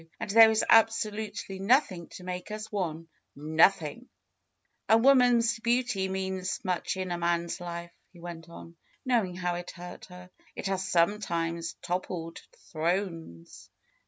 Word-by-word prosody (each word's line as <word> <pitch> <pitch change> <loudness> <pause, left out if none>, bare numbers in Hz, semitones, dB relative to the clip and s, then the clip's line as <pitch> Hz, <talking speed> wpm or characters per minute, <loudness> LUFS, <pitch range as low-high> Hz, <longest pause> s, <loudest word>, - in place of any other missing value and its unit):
And - - -4
there 225 +1 +9
is 220 0 +1
absolutely 215 -3 +2
nothing 195 - +2
to 180 - -10
make 180 +1 -6
us 215 0 -6
one; 165 -5 -3 0.3
nothing 160 - +2 0.4
!" - - -46
^^A 225 - +6
woman's 240 -3 +4
beauty 235 -4 0
means 190 -1 -3
much 185 0 -1
in 185 -1 -3
a 175 - -2
man's 170 +1 -1
life," 170 0 -6 0.2
he 175 - -17
went 170 -1 -9
on, 170 0 -12 0.3
knowing 225 -8 +1
how 180 -1 -2
it 175 0 -6
hurt 175 0 -10
her. 180 0 -13 0.3
^Ht - - -5
has 190 -1 -2
some 180 +4 +3
times 170 -3 -3
toppled 175 -2 -4 0.3
thrones." 165 - -3
185 Hz, 145 wpm, -28 LUFS, 170-215 Hz, 0.4 s, there